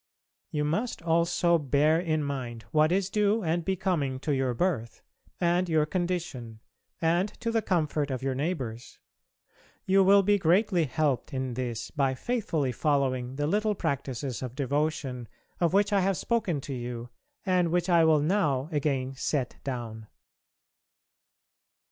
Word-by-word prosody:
You 150 -1 -1
must 200 +6 -2
also 170 +1 +2
bear 150 +3 +3
in 155 -3 0
mind 125 -5 -4
what 155 +1 +3
is 190 0 +1
due 210 +1 +2
and 170 +1 0
becoming 175 -8 -1
to 150 - -1
your 130 -2 0
birth 135 -9 -2 0.4
and 175 +1 +1
your 155 -2 +3
condition 165 - -3 0.4
and 175 +5 +2
to 230 -1 -2
the 225 -1 +1
comfort 155 -6 0
of 130 -1 -3
your 135 -1 0
neighbours. 130 -6 -4 0.9
You 195 +1 +4
will 200 +1 +6
be 205 +1 +3
greatly 180 0 +3
helped 145 0 -1
in 130 -1 -2
this 120 -2 -4
by 135 -3 0
faithfully 170 - -1
following 130 -2 0
the 145 +1 -1
little 210 +6 +1
practices 135 -4 -3
of 125 -1 -6
devotion 140 -3 -2 0.3
of 170 -2 +2
which 205 +2 +2
I 200 - +4
have 190 -1 +1
spoken 205 -11 -1
to 140 - -6
you, 120 -1 -5 0.4
and 180 -3 +2
which 175 +1 +1
I 170 -2 +5
will 155 -2 +4
now 150 -5 +1
again 135 -3 -1
set 135 -1 -2
down. 115 -5 -5
155 Hz, 150 wpm, -28 LUFS, 130-180 Hz, 0.9 s, will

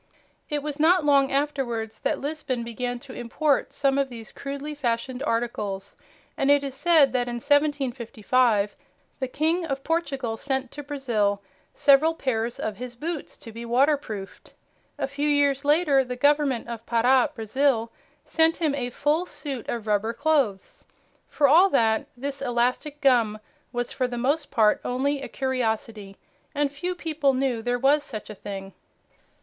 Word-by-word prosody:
It 295 -2 -2
was 300 0 -5
not 335 +1 +4
long 275 -2 +4
afterwards 265 -6 -2
that - - 0
Lisbon 275 -4 -3
began 245 +1 -3
to 265 -1 -11
import 275 +5 0
some 275 0 +1
of 275 -1 0
these 230 -3 -9
crudely 280 +2 -6
fashioned 250 -1 -2
articles, 210 -6 -2 0.4
and 275 - 0
it 285 0 +5
is 275 -2 -4
said 305 -2 +4
that 245 -1 0
in 240 - -3
1755 250 -6 +1 0.4
the 260 - -1
King 320 +6 0
of 275 -4 -3
Portugal 275 -8 -1
sent 265 0 -2
to 295 - -7
Brazil 235 -9 -1 0.3
several 295 +4 +5
pairs 235 -5 -2
of 215 -2 -3
his 245 +1 -7
boots 310 +4 -5
to 225 - -11
be 230 +2 -8
waterproofed. 240 -5 -1 0.4
A - - -1
few 285 +2 -1
years 285 -1 +2
later 290 -2 +4
the 250 -1 -5
Government 285 -2 +2
of 230 -1 -6
Para, 245 +2 +3
Brazil, 230 +1 +1 0.3
sent 325 0 +2
him 310 -4 0
a 250 -3 -2
full 300 +8 0
suit 275 -6 -6
of 230 -2 -3
rubber 215 +1 0
clothes. 280 -11 0 0.4
For 290 - +2
all 345 +8 +6
that, 225 -8 +2
this 275 +2 -5
elastic 250 +4 -1
gum 235 -6 +3 0.3
was 245 -1 -3
for 255 - -1
the 245 -1 -5
most 285 +5 0
part 220 -5 +3
only 275 +3 -1
a - - -5
curiosity, 225 -6 -3 0.4
and 290 -1 +1
few 355 +6 -3
people 305 -5 0
knew 255 -3 0
there 245 +2 0
was 280 +4 +3
such 215 -7 -7
a - - -6
thing. 195 -1 -8
265 Hz, 160 wpm, -25 LUFS, 235-290 Hz, 0.4 s, all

